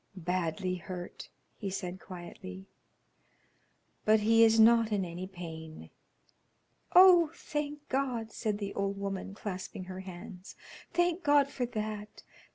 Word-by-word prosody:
"Badly 180 0 -1
hurt," 180 -1 -8 0.3
he 200 - -3
said, 185 -1 -4
quietly, 185 +1 -9 1.4
"but 215 0 +4
he 225 +2 +5
is 225 0 +5
not 225 0 +6
in 200 -3 +1
any 175 +2 -6
pain." 160 -4 -9 1.0
"Oh, 355 -3 +8
thank 295 -1 -4
God!" 250 -5 -1
said 215 -2 -2
the 200 -1 -4
old 200 0 -2
woman, 195 0 -4
clasping 190 -2 -6
her 185 0 -7
hands. 185 0 -9 0.4
"Thank 350 0 +1
God 290 -2 +4
for 250 -3 -2
that! 215 -2 -5
200 Hz, 125 wpm, -31 LUFS, 185-230 Hz, 1.4 s, Oh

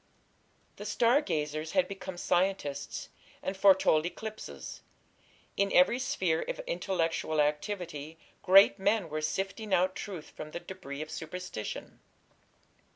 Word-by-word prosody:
The - - -7
"star 245 +5 +4
gazers" 155 - -2
had 185 -2 +3
become 190 -2 -7
scientists, 175 -6 -1 0.3
and 190 - -2
foretold 190 -5 +5
eclipses: 215 +5 -7 0.7
in 200 0 +1
every 185 +8 +5
sphere 185 -10 0
of - - -3
intellectual 170 - -1
activity 150 0 -1 0.2
great 195 +1 +7
men 200 -2 +1
were 155 +1 -2
sifting 195 +6 -1
out 185 +1 +2
truth 180 -6 -7
from 155 - -8
the - - -3
debris 155 -6 -7
of 155 - -11
superstition. 160 -8 -6
180 Hz, 120 wpm, -30 LUFS, 155-195 Hz, 0.7 s, great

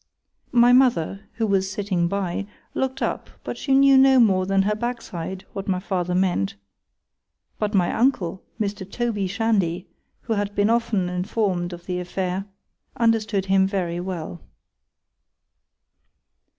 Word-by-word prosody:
_ - - -36 0.6
—My 240 +1 +7
mother, 215 -7 +2
who 225 - -1
was 195 -2 +1
sitting 195 -3 -1
by, 195 +1 -2 0.3
look'd 265 +1 -2
up, - - -2
but - - -4
she 270 - +1
knew 275 0 +6
no 265 -1 +6
more 190 -5 +4
than 195 0 +3
her 210 +2 +1
backside 190 -6 -5
what 195 - -5
my 185 -2 +1
father 180 -2 -2
meant,—but 175 - -4
my 180 -3 +2
uncle, 195 -8 +1 0.2
Mr. 200 -2 -3
Toby 225 -5 -1
Shandy, 195 -4 0 0.3
who 225 - -2
had 205 -1 -2
been 205 +2 +3
often 230 -5 +1
informed 180 0 -1
of 175 0 -9
the 180 -1 -2
affair,—understood 195 +3 -2
him 190 0 +3
very 180 -3 -2
well. 175 -2 -5
195 Hz, 135 wpm, -23 LUFS, 180-225 Hz, 0.6 s, My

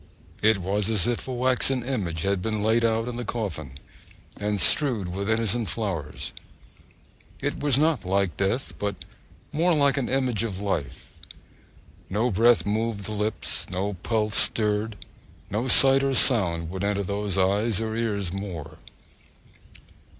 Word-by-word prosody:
It 110 0 +4
was 100 +3 -1
as 105 -4 +2
if 120 +1 -2
a - - -4
waxen 130 0 +1
image 95 - -3
had 100 -1 0
been 110 0 -2
laid 115 +2 +2
out 115 0 +1
in 120 -1 -5
the 120 - -4
coffin, 100 - -5 0.7
and 105 0 -1
strewed 105 - +4
with 100 +3 -4
innocent 115 0 0
flowers. 90 -10 -4 1.1
It - - -3
was 145 -3 +3
not 155 0 +1
like 95 -3 0
death, 100 - -2
but 100 -1 -2 0.6
more 170 +3 +2
like 140 -2 +2
an 135 - -1
image 130 -5 0
of 105 -5 -3
life! 100 -8 -4 1.0
No 110 +6 0
breath 115 +4 +3
moved 105 -1 -2
the - - -5
lips, 105 0 -3
no 95 +3 -2
pulse 110 -1 0
stirred, 105 0 +2 0.6
no 110 +6 -1
sight 135 +1 +7
or 135 -1 0
sound 85 - +2
would 95 +1 -5
enter 100 0 0
those 100 0 -3
eyes 100 +3 +1
or 110 0 -3
ears 100 -6 -2
more. 90 -7 -7
105 Hz, 150 wpm, -25 LUFS, 100-120 Hz, 1.1 s, sight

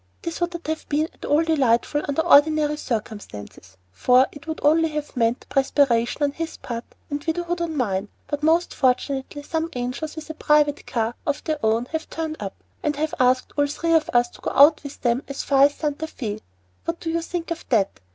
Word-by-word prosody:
This 335 +1 -4
would 345 0 +1
not 345 -1 -7
have 315 0 -4
been 305 +2 +1
at - - -10
all 300 +3 +3
delightful 290 -3 +2
under 285 +3 0
ordinary 300 -1 +5
circumstances, 205 - -6
for 250 - +4
it 290 +2 -13
would 315 - -4
only 320 +2 +4
have 300 -1 -5
meant 235 0 +1
perspiration 270 -1 +2
on 285 - +2
his 325 +3 -5
part 235 -1 -5 0.3
and 290 0 -3
widowhood 345 +2 -2
on 325 -2 -2
mine, 205 -5 -1 0.2
but 290 -1 -4
most 325 +3 +2
fortunately, 265 +2 0
some 320 +2 -2
angels 250 +6 -4
with 315 -1 -7
a - - -6
private 300 -1 +2
car 230 -1 -1
of 290 0 -1
their 310 -4 -3
own 220 +2 +2
have 320 0 -3
turned 320 -1 -4
up, 195 -2 -5 0.3
and 300 -1 0
have 305 +2 -2
asked 255 0 +2
all 290 -1 +2
three 330 +3 -1
of 320 -1 +3
us 240 0 +3
to - - -17
go - - -2
out 295 +2 +7
with 285 -1 -9
them 240 +1 +1
as 275 - -4
far 275 -1 +5
as 290 0 +1
Santa 300 +1 -2
Fé. 215 -8 -5 0.5
What 335 0 -2
do 325 - -3
you 335 +1 0
think 335 0 -5
of 335 - -3
that? 210 -6 +1
290 Hz, 210 wpm, -23 LUFS, 250-320 Hz, 0.5 s, out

